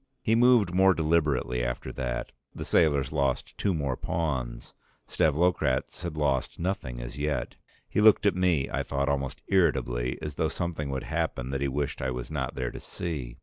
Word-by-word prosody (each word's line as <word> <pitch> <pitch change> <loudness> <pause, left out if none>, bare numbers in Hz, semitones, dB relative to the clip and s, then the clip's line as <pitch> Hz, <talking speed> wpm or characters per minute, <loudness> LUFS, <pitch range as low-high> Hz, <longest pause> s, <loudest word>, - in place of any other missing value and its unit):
He 110 - +2
moved 115 -6 +5
more 95 0 +5
deliberately 75 -6 +1
after - - -3
that; 60 -2 -3 0.2
the - - -5
sailors 75 -5 +3
lost 70 -4 -1
two 100 - 0
more 70 -7 -1
pawns, 65 -8 -3 0.3
Stavlokratz 75 -4 +1
had 85 -3 -5
lost 70 -4 0
nothing 85 -9 -3
as - - -7
yet. 75 0 -2 0.3
He - - 0
looked 110 -1 +6
at 100 - +5
me 90 -7 +2
I - - -2
thought 70 0 -1
almost 70 -1 -2
irritably, 65 -9 +1
as 75 -2 -6
though 80 - +2
something 80 -4 -3
would 65 -1 -3
happen 65 +2 -2
that 70 0 -2
he 70 - +1
wished 70 +1 -2
I 65 - 0
was 60 -1 -5
not - - -3
there 65 -2 -2
to - - -8
see. 70 -9 -5
75 Hz, 180 wpm, -28 LUFS, 65-85 Hz, 0.3 s, looked